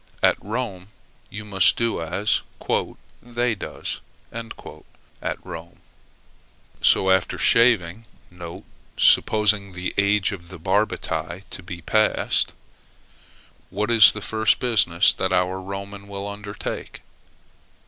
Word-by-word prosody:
At - - +3
Rome, 105 -4 -4 0.4
you 105 +1 -8
must 95 -3 +4
do 115 -6 0
as 95 +6 0 0.8
"they 120 0 -1
does" 105 - -5 0.3
at 115 0 -9
Rome. 85 +1 -9 1.0
So, 95 - +4
after 95 -1 +1
shaving, 115 -4 +3 0.9
(supposing 105 -2 +3
the 90 +1 -4
age 100 +1 +2
of 85 -4 -8
the 95 - -9
Barbati 90 +3 -1
to - - -7
be 85 -1 -8
passed), 110 +5 +2 1.1
what 105 +4 -2
is 110 -3 +8
the 105 - -6
first 110 +1 +2
business 100 -9 +3
that - - -2
our 90 +1 0
Roman 100 +1 -7
will 100 0 -6
undertake? 100 0 -7
100 Hz, 105 wpm, -23 LUFS, 95-110 Hz, 1.1 s, is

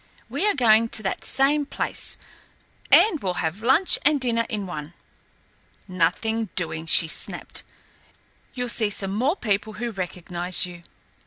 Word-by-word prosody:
We 420 - -1
are 415 - +2
going 230 -3 +4
to 220 - -2
that 190 - -3
same 285 +2 +2
place, - - +1 0.7
and 350 -9 +5
we'll 185 -2 -2
have 170 +5 -3
lunch 270 +10 +3
and 295 0 +4
dinner 230 -3 0
in 210 -4 -3
one." 160 -2 -8 0.9
"Nothing 200 +5 -1
doing," 165 -2 -2
she 165 - +4
snapped. 155 - -3 0.9
"You'll 245 -1 -2
see 220 -2 +1
some 195 -1 -3
more 260 - +1
people 215 - -2
who 240 +2 -5
recognise 180 -2 0
you." 175 -1 -9
215 Hz, 145 wpm, -23 LUFS, 180-245 Hz, 0.9 s, and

